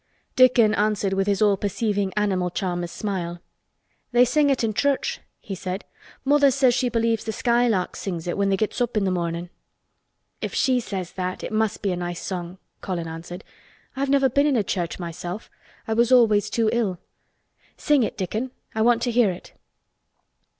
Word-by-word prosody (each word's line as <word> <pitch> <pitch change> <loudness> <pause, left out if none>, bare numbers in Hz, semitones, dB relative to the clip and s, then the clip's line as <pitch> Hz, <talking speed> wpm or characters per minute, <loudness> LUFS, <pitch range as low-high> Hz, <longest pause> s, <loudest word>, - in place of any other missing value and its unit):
Dickon 250 -4 +5
answered 210 -2 +1
with 195 0 0
his 200 0 +2
all 205 -2 +4
perceiving 205 0 -1
animal 190 -4 +1
charmer's 175 -1 -3
smile. 175 -4 -4 0.7
"They 245 +1 +5
sing 285 +4 +2
it 270 -3 +1
i' 225 - +1
church," 285 - 0 0.2
he 200 - -7
said. 185 +1 -5 0.4
"Mother 285 0 +5
says 260 -2 +3
she 250 0 +1
believes 230 -1 0
th' - - -16
skylarks 235 -6 +1
sings 175 -5 -4
it 175 - -2
when 200 0 +1
they 195 - +2
gets 215 +4 -2
up 240 -2 0
i' - - +5
th' 195 -2 0
mornin'." 170 0 -3 0.9
"If - - -4
she 255 -2 +3
says 190 -6 -5
that, 185 0 -4
it - - -5
must 215 -1 0
be 200 - +1
a - - -1
nice 175 -1 -4
song," 180 -1 -5 0.2
Colin 175 -4 -3
answered. 170 +4 -8 0.5
"I've 275 +1 -1
never 275 -1 +4
been 280 +3 +2
in 285 - +2
a 215 - +2
church 175 -3 -2
myself. 175 +3 -6 0.4
I 220 - 0
was 235 +2 +2
always 220 -5 +5
too 225 -2 +1
ill. 215 -7 0 0.8
Sing 295 -3 +3
it, 225 - -2
Dickon. 215 +6 -2 0.2
I 220 - -1
want 235 +1 +3
to 245 - 0
hear 235 -3 +4
it." 180 -1 -8
210 Hz, 185 wpm, -24 LUFS, 185-240 Hz, 0.9 s, Dickon